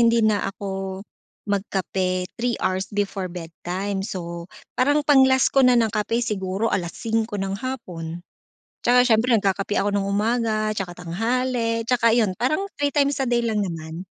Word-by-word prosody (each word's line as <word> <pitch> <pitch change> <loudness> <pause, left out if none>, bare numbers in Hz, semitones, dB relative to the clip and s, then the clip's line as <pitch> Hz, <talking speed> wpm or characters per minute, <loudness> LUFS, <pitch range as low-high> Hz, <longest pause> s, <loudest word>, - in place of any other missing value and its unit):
hindi 230 -1 +4
na 205 -2 +2
ako 195 -1 -5 0.4
magkape 190 -2 -1 0.2
3 240 0 0
hours 190 +1 -1
before 200 -2 -2
bedtime, 180 +3 -4
so 170 -3 -5 0.2
parang 290 +3 +2
pang-last 265 -2 +5
ko 270 - +5
na 250 -2 +6
ng 225 -1 +2
kape 230 +3 0
siguro 200 0 -1
5:00 220 +5 -1
ng 195 -1 -2
hapon, 175 -10 -6 0.6
'tsaka 245 +1 +6
siyempre 240 0 +3
nagkakape 200 -1 +1
ako 205 - +1
ng 195 - -1
umaga 215 +1 0
'tsaka 180 -3 -3
tanghali, 230 +6 -1
'tsaka 230 -1 +3
iyon 215 -6 +2
parang 265 +9 +1 0.2
3x 285 0 +1
a 270 - 0
day 240 -1 +2
lang 215 -3 0
naman. 165 +1 -6
210 Hz, 150 wpm, -23 LUFS, 190-240 Hz, 0.6 s, na